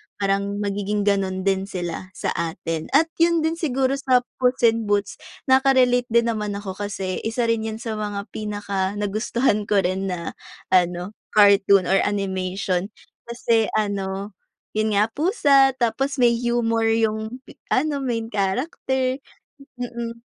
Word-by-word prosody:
parang 200 0 -1
magiging 205 +1 -1
ganun 195 -2 0
din 195 0 0
sila 180 -1 -5
sa - - -2
atin 165 -1 -3
at 325 +3 +4
yun 335 -1 +3
din 325 +1 -1
siguro 270 -3 0
sa 255 -2 +3 0.2
Puss 250 -1 +1
in 225 -1 +3
Boots, 200 -1 0 0.2
naka-relate 260 -2 +4
din 235 0 +2
naman 210 -2 -3
ako 200 0 -5
kasi 190 -2 -4
isa 230 +2 -1
rin 220 -1 -1
'yan 220 0 -5
sa 220 -2 -4
mga 205 -1 -3
pinakanagustuhan 205 +2 -1
ko 210 - +1
rin 190 +2 -1
na 175 -3 -4 0.4
ano, 180 +1 +2 0.2
cartoon 200 -2 +6
or 195 +1 +3
animation, 190 -2 -2 0.4
kasi 230 -2 +1
ano, 200 -1 -3 0.4
yun 215 0 +1
nga, 210 - +5
pusa 290 - +4
tapos 270 +4 0
may 240 -1 +5
humor 230 -1 +1
yung 220 +1 -1 0.3
ano, 285 +1 +1
main 230 -3 -1
character, 255 - -1 0.6
mm, 235 -1 -4
215 Hz, 135 wpm, -23 LUFS, 195-245 Hz, 0.6 s, cartoon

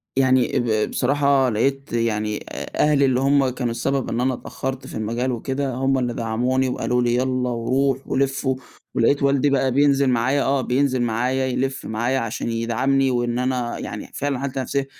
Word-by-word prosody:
يعني 130 -2 +3
اآ 110 -3 +1
ب - - -9
بصراحة 140 0 +2
لقيت 135 +5 -1
يعني 110 -2 0
أ - - -7
أهلي 140 -2 +4
اللي 130 -1 +2
هم 135 0 +3
كانوا 125 -1 -3
السبب 135 +3 -1
إن 115 - -1
أنا 130 +1 +1
اتأخرّت 130 +1 -5
في - - -9
المجال 115 +4 -1
وكده، 135 +3 -2
هم 135 +1 +1
اللي 120 -1 -1
دعموني 125 +4 0
وقالوا 125 0 0
لي 120 0 +1
يلّا، 130 0 0
وروح، 130 +3 0
ولِف، 135 +1 0
و 130 0 +2 0.4
ولقيت 140 +5 +2
والدي 140 0 +3
بقى 135 -1 +2
بينزل 140 0 +3
معايا 130 +3 +2
آه، 135 0 +1
بينزل 130 0 +1
معايا 125 +3 0
يلف 130 +1 -2
معايا 120 +4 0
عشان 115 0 -3
يدعمني، 130 +4 +1
وإن 120 -1 0
أنا 125 -2 -1
يعني - - -7
فعلًا 140 -2 -2
حتي 135 0 -3
نفسيًا. 135 +1 -1
130 Hz, 180 wpm, -22 LUFS, 120-135 Hz, 0.4 s, أهلي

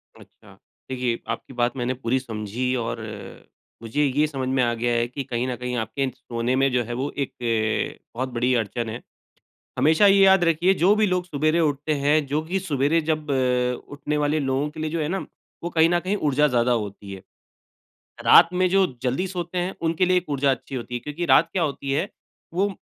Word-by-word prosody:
अच्छा। - - -18 0.4
देखिए 125 -2 -1
आपकी - - -5
बात 120 0 0
मैंने 125 0 -1
पूरी 130 0 -1
समझी 120 +1 -3
और 115 -1 -3
अ, 110 -2 -9 0.4
मुझे 115 +6 -1
ये 145 +3 +2
समझ 135 -3 -4
में 130 -1 +2
आ 120 -1 +1
गया 120 +1 -1
है 120 0 +1
कि 130 +3 -5
कहीं 120 0 -2
न 125 - -2
कहीं, 125 +1 -4
आपके 120 +5 -2
सोने 120 -1 -2
में 135 +1 +2
जो 125 -1 +2
है 120 +1 -6
वो 130 +4 -2
एक 140 -2 -2 0.7
अ, - - -42
बहुत 130 +2 -2
बड़ी 120 +2 +1
अड़चन 115 +3 -4
है। 115 +2 -6 0.8
हमेशा 160 +7 +5
ये 195 0 +6
याद 190 -1 +6
रखिए, 170 +3 +3
जो 190 +3 +3
भी 215 0 +3
लोग 180 -1 0
सवेरे 155 0 +1
उठते 150 -1 0
हैं 145 +2 +2
जो 145 +3 0
कि 180 +4 -2
सवेरे 155 -2 +1
जब 155 -1 -2
अ, 125 -2 +1
उठने 145 +1 -3
वाले 150 +1 +1
लोगों 135 +1 -1
के 155 - -10
लिए 155 0 -2
जो 165 0 -1
है 150 - -1
ना, 190 +3 -3 0.4
वो 170 - -2
कहीं 165 -1 +4
न 175 0 +2
कहीं 185 +3 -1
ऊर्जा 150 -5 +2
ज़्यादा 125 -2 +1
होती 100 -3 -3
है। 95 - -9 1.0
रात - - +8
में 185 0 +2
जो 195 0 +4 0.2
जल्दी 130 +9 0
सोते 180 -1 -4
हैं, 180 +2 -2
उनके 165 +2 +1
लिए 185 0 +2
एक 180 -2 -1
ऊर्जा 140 -1 +2
अच्छी 135 +1 -4
होती 125 -1 -5
है। 120 - -2
क्योंकि 150 +6 -4
रात 165 0 +5
क्या 185 - 0
होती 140 -2 -3
है, 140 - 0 0.5
वो 195 +3 +2
140 Hz, 215 wpm, -24 LUFS, 125-165 Hz, 1.0 s, रात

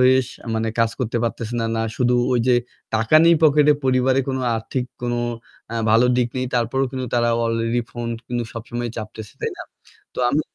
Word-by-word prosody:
হয়ে 130 +1 +6 0.6
কাজ 115 - +3
করতে 120 -2 -2
পারতেছে 115 0 -3
না। 115 - 0
না 115 - 0
শুধু 125 -1 +2 0.2
ওই 120 - +3
যে 125 - +6 0.4
টাকা 115 +7 +4
নেই 170 0 +7
পকেটে 150 -1 +6
পরিবারে 130 0 +3
কোন 130 - -1 0.2
আর্থিক 125 +3 -3 0.2
কোন 120 0 -1 0.6
আ - - -3 0.2
ভালো 115 +3 +5
দিক 125 -1 +2
নেই। 130 0 -1
তারপরেও 125 +3 +1
কিন্তু 130 -1 -3
তারা 120 -1 +2 0.2
অলরেডি 115 +1 0
ফোন 120 -1 -5 0.2
কিন্তু 120 -1 -2
সবসময় 120 +1 -4
চাপতেছে। 110 -1 -7
তাই - - -1
না? - - -7 0.5
তো - - -8
আমি 145 +5 +2
120 Hz, 180 wpm, -22 LUFS, 115-130 Hz, 0.6 s, নেই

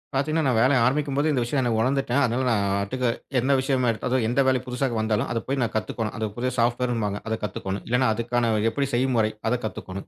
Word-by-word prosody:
பாத்தீங்கன்னா, 155 +4 +1
நான் 125 -4 +2
வேலை 135 +2 +4
ஆரம்பிக்கும்போதே 145 +3 +1
இந்த 130 - +1
விஷயம் 130 +3 0
எனக்கு 120 -3 0
உணர்ந்துட்டேன். 135 +1 +1
அதுனால 125 +2 -1
நான் 100 -3 +1 0.2
ஒட்டுக்க 125 +5 -2 0.3
எந்த 130 +3 +1
விஷயமே 130 -2 +1 0.4
எந்த 125 +4 +2
வேலை 130 -1 +3
புதுசா 125 +2 -1
வந்தாலும், 110 -1 0
அதைப் 115 -1 -2
போய் 135 +1 -1
நான் 115 - -2
கத்துக்கணும். 110 0 -2
அது 110 - -1
புது 125 +1 -1
software 120 +1 +1
ன்னுப்பாங்க. 105 -4 -2
அதைக் 110 -1 -3
கத்துக்கணும். 100 -1 -4
இல்லைன்னா 125 +1 +2
அதுக்கான 115 0 0 0.2
எப்படி 140 +2 -1
செய்யும் 130 +2 +1
முறை 110 -1 +2 0.2
அதைக் 125 -1 -1
கத்துக்கணும். 95 -1 -6
120 Hz, 205 wpm, -24 LUFS, 110-130 Hz, 0.4 s, வேலை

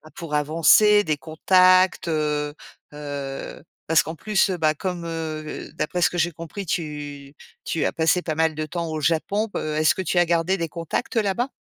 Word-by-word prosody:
pour 165 -3 -7
avancer, 165 +8 +5
des 155 -1 +1
contacts, 185 +4 +3
heu 150 -2 -1 0.4
heu 145 -1 -6 0.2
parce 165 -1 +4
qu'en 160 +2 -6
plus, 210 +2 +1
heu, 180 - -2
bah, 155 -1 +2
comme, 175 +1 -4
heu, 160 -2 -5
d'après 175 +4 -2
ce - - +4
que 175 - -5
j'ai 170 +1 +1
compris, 165 +5 -8
tu 145 -4 -5 0.3
tu 160 - -1
as - - -1
passé 165 +2 +2
pas 155 -3 -3
mal 160 0 +2
de 155 0 -3
temps 170 +1 -4
au 155 -1 -3
Japon. 185 +8 0
Heu, 155 -1 -2
est-ce 155 -1 +3
que 190 - -3
tu 175 0 -2
as 175 - +5
gardé 170 +3 +1
des 165 -1 -2
contacts 170 - -4
là-bas? 225 +4 0
165 Hz, 190 wpm, -23 LUFS, 155-180 Hz, 0.4 s, avancer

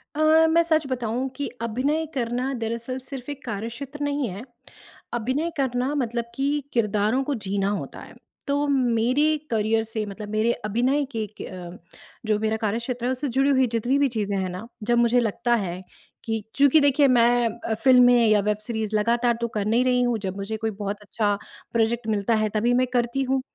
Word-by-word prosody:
अ, 315 +1 +5
मैं 335 +1 +4
सच 315 -3 +2
बताऊँ 250 0 -2
कि 285 - -3
अभिनय 270 +8 0
करना 250 +1 -1
दरअसल 235 +3 -3
सिर्फ़ 265 -1 -7
एक 285 -1 -9
कार्यक्षेत्र 235 +6 -6
नहीं 285 -2 -1
है, 195 +4 -7 0.7
अभिनय 260 +8 -1
करना 260 0 0
मतलब 235 -4 -1
कि 285 +2 0
किरदारों 215 +3 +1
को 290 - -2
जीना 195 0 0
होता 205 - -4
है, - - -13 0.3
तो 285 +1 +1
मेरे 260 +3 +2
करियर 220 0 +1
से 220 -1 -3
मतलब 205 +1 -8
मेरे 215 +2 +1
अभिनय 250 +7 +1
के 220 -1 -1
क - - -4
अ, 180 -1 -8 0.5
जो 215 -1 +1
मेरा 220 0 0
कार्यक्षेत्र 235 +3 -2
है 255 - +1
उससे 260 +3 -2
जुड़ी 270 +3 +2
हुई 260 -2 +4
जितनी 240 +4 +1
भी 285 - +4
चीज़ें 205 -4 -2
हैं 185 -1 -1
ना, 185 +5 -7 0.2
जब 240 +2 +2
मुझे 240 +1 +4
लगता 235 +1 +1
है 185 -4 -3 0.4
कि 225 -1 -2
चूँकि 285 +2 +5
देखिए 285 0 +4
मैं 240 -1 +4 0.2
अ, 220 - +2
फिल्में 245 -2 +6
या 215 -1 +5
वेब 210 +1 0
सीरीज़ 220 -2 -2
लगातार 235 +2 +2
तो 235 - +1
कर 205 - 0
नहीं 235 +4 +2
रही 250 -1 +3
हूँ, 245 -2 +1
जब 195 -1 -4
मुझे 200 +3 -4
कोई 220 0 -2
बहुत 205 0 -3
अच्छा 205 0 0 0.4
प्रोजेक्ट 230 0 +1
मिलता 215 +1 +1
है 215 0 +1
तभी 235 +3 +2
मैं 255 +1 +2
करती 245 +2 +1
हूँ। 265 0 0
235 Hz, 190 wpm, -24 LUFS, 215-265 Hz, 0.7 s, फिल्में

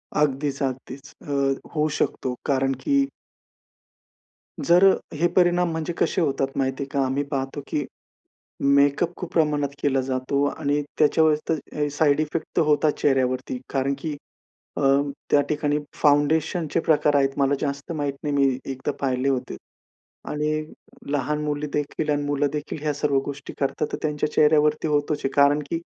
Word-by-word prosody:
अगदीच, 145 -1 0
अगदीच. 130 +1 -5
अ, 140 -1 -1
होऊ 150 0 +2
शकतो, 125 -1 -1
कारण 135 -1 +1
की 280 -1 +3 1.6
जर 175 +2 +5
अ, - - +3 0.2
हे 160 +3 +2
परिणाम 175 -1 +3
म्हणजे 160 +1 -3
कसे 185 - +1
होतात 135 -3 +1
माहिती 135 0 -1
आहे - - -7
का? 140 -2 +1
आम्ही 135 +2 0
पाहतो, 135 +1 -3
की 145 -3 -2 0.8
मेकअप 140 +5 +3
खूप 180 - -6
प्रमाणात 150 -3 +2
केला 135 -2 +2
जातो 130 +2 -1
आणि 145 +1 -1 0.2
त्याच्यावर 155 0 +4
ते - - +4 0.3
ए 145 - 0
साइड 145 0 +2
इफेक्ट 155 +2 -2
होतात 150 -1 +3
चेहऱ्यावरती. 130 -2 +1
कारण 135 0 0
की 150 0 -4 0.6
अ, - - -1 0.5
त्या 145 - +6
ठिकाणी 150 -1 0 0.2
फाउंडेशनचे 155 +3 +2
प्रकार 150 -2 +3
आहेत, 135 -1 +4
मला 140 0 +2
जास्त 140 +2 -3
माहीत 145 -3 -2
नाही, 145 -1 -1
मी 135 -2 +3
एकदा 135 +2 -3
पाहिले 130 0 +1
होते. 130 - -2 0.7
आणि 150 0 -1 0.6
लहान 150 +1 0
मुली 150 0 -2
देखील 150 +1 -2
आणि 145 0 0
मुलं 145 0 +1
देखील 150 0 -4
ह्या 150 -1 0
सर्व 145 -1 0
गोष्टी 145 0 -7
करतात, 145 +2 -1
तर - - -1
त्यांच्या 150 0 -1
चेहऱ्यावरती 150 0 +3
होतोच 145 0 0
आहे. 135 - +1
कारण 145 +1 +4
की 165 0 -1
145 Hz, 155 wpm, -24 LUFS, 140-150 Hz, 1.6 s, त्या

